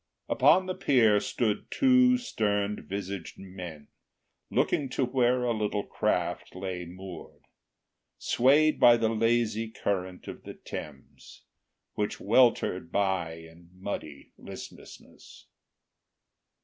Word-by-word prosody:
Upon 185 - +4
the 185 - -3
pier 115 - +3
stood 110 0 -2
two 255 -1 +4
stern 105 - -2
visaged 100 -2 -5
men, 90 -6 -9 0.6
Looking 140 -3 0
to 130 - 0
where 125 0 +1
a 120 -1 +1
little 105 -2 -1
craft - - -2
lay 90 -2 -5
moored, 90 +1 -11 0.7
Swayed 145 +5 +3
by 120 -1 +7
the 115 -1 +1
lazy 115 0 +1
current 95 -4 -3
of - - -8
the - - -10
Thames, 70 -3 -10 0.5
Which 105 0 -3
weltered 100 -6 +2
by 95 -5 0
in 80 +1 -15
muddy 95 -7 -7
listlessness. - - -12
105 Hz, 110 wpm, -28 LUFS, 90-120 Hz, 0.7 s, by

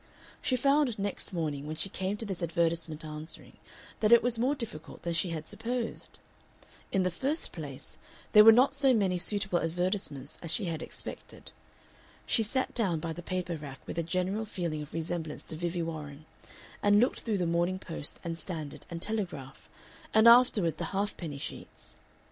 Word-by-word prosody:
She 255 - +1
found 275 -1 +3
next 200 0 -3
morning, 150 -5 -2
when 155 - -3
she 175 - 0
came 190 +1 -2
to 225 - -4
this 190 -4 -4
advertisement 165 -1 0
answering, 155 +1 -8 0.4
that 215 0 +3
it 235 -1 +8
was 240 -1 +1
more 260 +5 +2
difficult 190 - -7
than 170 - -1
she 170 +2 +1
had 160 -2 -4
supposed. 240 0 -3 0.7
In 190 - +2
the 185 - +1
first 275 - 0
place - - -8 0.3
there 210 -1 +9
were 225 - +11
not 250 +5 +5
so 270 -2 +4
many 190 -4 +2
suitable 195 -1 +1
advertisements 165 -5 -2
as 170 - -5
she 165 +6 0
had 165 -2 -3
expected. - - -5 0.7
She 230 - +3
sat 260 +5 0
down 190 -9 +1
by 165 +1 -3
the 175 - -7
paper 180 -1 -2
rack 145 -4 -8
with - - -4
a - - +3
general 185 +6 -1
feeling 170 -7 -3
of 150 - -8
resemblance 160 -1 -3
to - - -8
Vivie 170 +1 -2
Warren, 155 -2 -6 0.6
and 205 0 +5
looked 250 +4 +2
through 220 -3 -1
the 180 - 0
Morning 170 +2 +1
Post 165 -5 -3
and 165 -1 -4
Standard 155 -6 -6
and 170 0 -4
Telegraph, 180 -12 -4 0.5
and 220 +1 +7
afterward 235 -8 +6
the - - -1
half 205 +1 0
penny 155 -5 -6
sheets. - - -8
180 Hz, 180 wpm, -30 LUFS, 160-215 Hz, 0.7 s, were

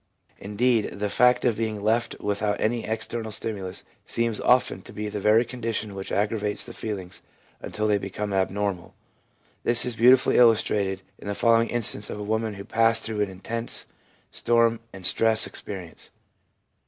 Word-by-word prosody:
Indeed, 110 +2 0
the 105 0 -2
fact 125 +4 +3
of 120 -3 +2
being 110 -1 -2
left 115 +2 0
without 105 0 -1
any 115 +1 0
external 110 +1 -4
stimulus 100 -4 -5 0.2
seems 115 -2 -1
often 125 -6 +2
to - - -13
be 105 +1 -5
the 105 - -4
very 110 +4 +4
condition 115 -3 -4
which 95 0 -7
aggravates 105 0 0
the 120 - -8
feelings 95 -6 -6 0.4
until 105 - -3
they 105 -1 +2
become 100 +1 -4
abnormal. 95 -1 -2 0.7
This 120 0 +3
is 125 -2 -3
beautifully 125 +3 +5
illustrated 105 -5 +3 0.2
in - - -10
the 100 - -2
following 115 +1 +3
instance 115 -3 +1
of - - -6
a - - -4
woman 110 0 -2
who 100 0 -9
passed 115 0 +3
through 110 -2 -2
an 105 - 0
intense 115 +5 -4 0.5
storm 115 -1 +2
and 95 -2 -9
stress 110 +2 +4
experience. 95 -5 -7
110 Hz, 160 wpm, -25 LUFS, 100-115 Hz, 0.7 s, beautifully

